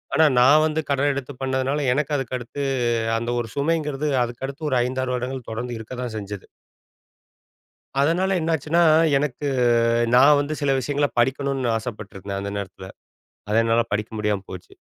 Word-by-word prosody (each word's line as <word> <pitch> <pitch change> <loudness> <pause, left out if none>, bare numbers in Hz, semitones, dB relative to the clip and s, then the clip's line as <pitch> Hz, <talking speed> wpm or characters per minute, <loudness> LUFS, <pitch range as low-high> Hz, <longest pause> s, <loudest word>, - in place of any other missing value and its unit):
ஆனா 160 - +5
நான் 145 +5 +6
வந்து 160 0 0
கடன் 140 +1 +2
எடுத்து 140 0 -5
பண்ணதுனால 135 +2 -1
எனக்கு 150 +2 -1
அதுக்கடுத்து, 130 +1 -5 0.6
அந்த 115 +1 -3
ஒரு 120 - -3
சுமைங்கிறது 150 -1 -1 0.2
அதுக்கடுத்து 135 +5 -5
ஒரு 130 - +3
5,6 130 0 -2
வருடங்கள் 125 0 -5
தொடர்ந்து 120 +2 -4
இருக்க 110 +3 -9
தான் 120 -3 -5
செஞ்சது. 100 -1 -7 1.5
அதனால, 180 +6 +1
என்னாச்சுன்னா 160 +1 +1 0.4
எனக்கு 145 0 -3 0.7
நான் 145 +4 +7
வந்து 145 +2 -3
சில 140 -1 +1
விஷயங்கள 145 +2 0
படிக்கணுன்னு 135 0 0
ஆசைப்பட்டிருந்தேன். 100 -4 -6
அந்த 100 - -4
நேரத்தில, 95 -1 -7 0.6
அத 105 - +1
என்னால 115 +1 +2
படிக்க 105 +1 -1
முடியாம 105 -2 -1
போச்சு. 90 -2 -10
130 Hz, 140 wpm, -23 LUFS, 115-145 Hz, 1.5 s, நான்